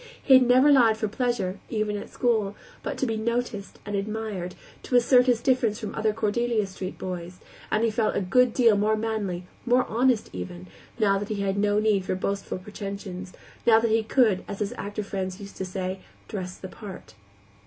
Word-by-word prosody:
He 270 - +4
had 260 - +9
never 255 +4 +5
lied 235 -6 +5
for 220 - -1
pleasure, 210 -5 -1
even 215 -2 -1
at 205 - -6
school; 220 -5 0 0.3
but - - -4
to - - 0
be 225 -3 -1
noticed 230 -2 -2
and 205 0 -3
admired, 200 -3 -3 0.3
to 250 - -2
assert 245 +1 +5
his 240 -2 +3
difference 250 -5 +2
from 215 - -5
other 220 0 +1
Cordelia 220 +1 0
Street 190 0 -6
boys; 180 -1 -6 0.3
and 215 - +1
he 230 - +2
felt 220 0 0
a - - +2
good 245 +6 +3
deal 230 -3 +4
more 210 +2 +2
manly, 210 -5 -2 0.2
more 250 +1 +3
honest, 240 0 +1
even, 90 -1 -6 0.3
now 200 -3 +3
that 205 - -5
he 210 -2 -2
had 195 -1 0
no 205 0 +2
need 210 -2 +2
for 185 - -1
boastful 195 +1 -3
pretensions, 195 -1 -7 0.3
now 225 -1 +7
that 225 -1 0
he 225 +1 +4
could, 220 -4 +2
as 200 - -5
his 205 0 -2
actor 205 +1 -4
friends 190 -2 -4
used 200 -1 -10
to 190 - -3
say, 185 0 -4 0.3
"dress 185 -3 -5
the 190 - -8
part." 195 0 -10
210 Hz, 195 wpm, -26 LUFS, 195-230 Hz, 0.3 s, had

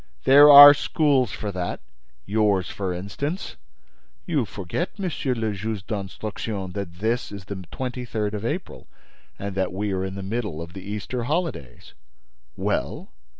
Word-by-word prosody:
"There 145 +2 +8
are 145 0 +12
schools 140 - +1
for 105 +2 -5
that: 90 -2 -4 0.5
yours, 105 -4 +1
for 95 -2 -3
instance." 120 - -4 0.7
"You 150 -8 0
forget, 100 - -5
Monsieur 170 -9 -2
le 110 -2 -2
Juge 100 0 -4
d'Instruction, 100 -1 -5
that 95 -2 -5
this 110 +6 -2
is 100 -2 -9
the 95 -1 -7
twenty 125 -1 -4
third 110 -3 -3
of 105 0 -4
April 160 +10 -5 0.5
and 100 0 -5
that 95 -1 -1
we 100 +2 -2
are 95 0 -1
in 95 0 -5
the 100 - -6
middle 105 -5 -3
of 85 +1 -8
the 95 - -8
Easter 105 +5 -4
holidays." 150 - -4 0.6
"Well?" - - -2
105 Hz, 150 wpm, -24 LUFS, 95-130 Hz, 0.7 s, are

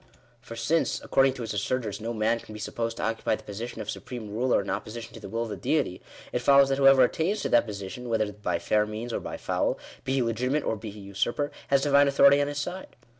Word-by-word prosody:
For 115 -1 -9
since, 150 +8 +1
according 135 0 +3
to 125 -2 -6
its 110 - -4
assertors, 105 +1 -2
no 115 +2 -3
man 115 +1 +1
can 110 - -12
be 105 - -8
supposed 115 +1 -3
to - - -4
occupy 115 -1 0
the - - -13
position 110 +4 -6
of - - -6
supreme 115 -5 -7
ruler 120 +4 +2
in 100 - -3
oppo - - -3
sition 115 +1 -7
to - - -10
the 100 - -9
will 115 +2 -1
of 115 - -5
the 105 - -4
Deity, 100 - -1 0.3
it 125 - 0
follows 140 +2 +5
that 135 0 0
whoever 135 -1 +7
attains 175 - 0
to - - -2
that 120 0 +4
position, 105 +4 -6
whether 110 -2 0
by 95 -4 -2
fair 105 +4 +1
means 110 +3 -5
or - - -1
by - - -6
foul, - - -1 0.3
be 130 - -1
he 135 - +2
legi 120 +2 -1
timate 150 +2 0
or - - 0
be 110 +1 -7
he 105 0 -10
usurper, 120 +9 -2 0.2
has 140 0 +3
Divine 145 0 +5
authority 140 +1 +6
on 145 - +1
his 145 0 -4
side. 180 +6 -5
115 Hz, 255 wpm, -27 LUFS, 110-135 Hz, 0.3 s, whoever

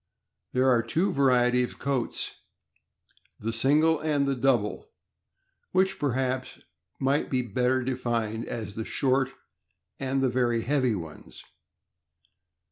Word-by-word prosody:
There 130 +1 +3
are 120 -3 +5
two 160 - 0
varieties 125 -2 +3
of - - -20
coats, 135 -4 -2 1.1
the 115 +2 -3
single 150 +7 +3
and 140 -4 0
double, 120 -6 +1 0.8
which 190 +1 +2
perhaps 130 -1 -1 0.4
might 135 +2 +1
be 130 -2 0
better 125 +3 +1
denned 115 -3 -2
as 110 -4 -5
the 110 - -4
short 135 +2 +1 0.7
and 135 0 0
the 130 - +3
very 120 -2 +1
heavy 130 -4 +1
ones. 80 -5 -9
130 Hz, 115 wpm, -27 LUFS, 120-135 Hz, 1.1 s, are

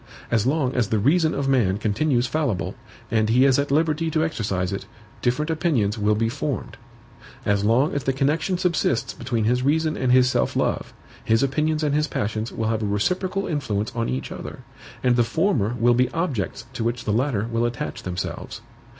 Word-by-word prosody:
As 115 0 +2
long 135 -2 +1
as 120 -5 +1
the 110 - +1
reason 155 - +3
of 140 -1 -1
man 115 -8 +2
continues 120 +4 +1
fallible, 130 - -1 0.4
and 110 -1 +2
he 125 +4 +5
is 135 0 +4
at 140 - 0
liberty 160 +2 +1
to 155 0 +1
exercise 100 - -2
it, 95 0 -5 0.3
different 140 +6 0
opinions 145 - +1
will 105 -1 +1
be 115 +2 +1
formed. 130 -2 -3 0.7
As 100 -1 +2
long 120 +8 +3
as 140 - -2
the 135 - +2
connection 150 +7 0
subsists 170 -9 0
between 120 -2 -2
his 125 +3 +2
reason 155 +3 +1
and 130 -1 0
his 125 0 +6
self 130 - 0
love, - - -1 0.3
his 115 +3 +2
opinions 155 +3 0
and 145 -2 +1
his 150 +1 +2
passions 110 -2 -2
will 110 0 -2
have 110 -1 0
a 105 - -1
reciprocal 185 - 0
influence 110 -9 -2
on 115 -1 -1
each 65 +1 -3
other; - - -7 0.4
and 125 -1 +3
the 120 - +5
former 120 - +1
will 120 +1 +4
be 125 +1 +2
objects 140 - -2
to - - -3
which 120 +1 -1
the 105 - 0
latter 115 -3 0
will 115 0 +1
attach 120 -1 -5
themselves. 90 0 -5
125 Hz, 195 wpm, -23 LUFS, 110-150 Hz, 0.7 s, his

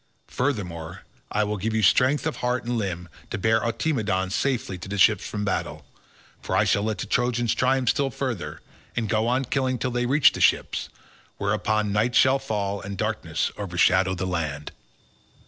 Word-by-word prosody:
Furthermore 90 - -3 0.3
I 105 - +1
will 105 0 -2
give 110 +3 -2
you 110 - +1
strength 130 +9 +4
of 160 - -2
heart 125 0 -1
and 120 +1 -2
limb 90 -5 -3 0.2
to - - -3
bear 110 +3 +2
Automedon 110 -7 -1
safely 125 -3 -1
to 90 - -8
the 105 - -3
ships 105 0 +4
from 105 -1 -3
battle, - - -3 0.6
for - - -2
I - - +4
shall 100 - +2
let 110 0 -1
the - - -4
Trojans 120 +1 +1
triumph 130 -1 +2
still 140 -1 +1
further, 120 - -4 0.3
and 115 - -1
go 110 +2 +1
on 130 +2 +1
killing 130 0 0
till 125 +2 -2
they 120 0 0
reach 140 +3 +5
the - - -6
ships; - - +2 0.5
whereon 105 +1 0
night 110 +4 +1
shall 130 +1 +5
fall 100 -6 -2
and 100 0 -6
darkness - - -1
overshadow 95 -1 +2
the 95 - -3
land." 80 -5 -3
110 Hz, 180 wpm, -25 LUFS, 95-125 Hz, 0.6 s, reach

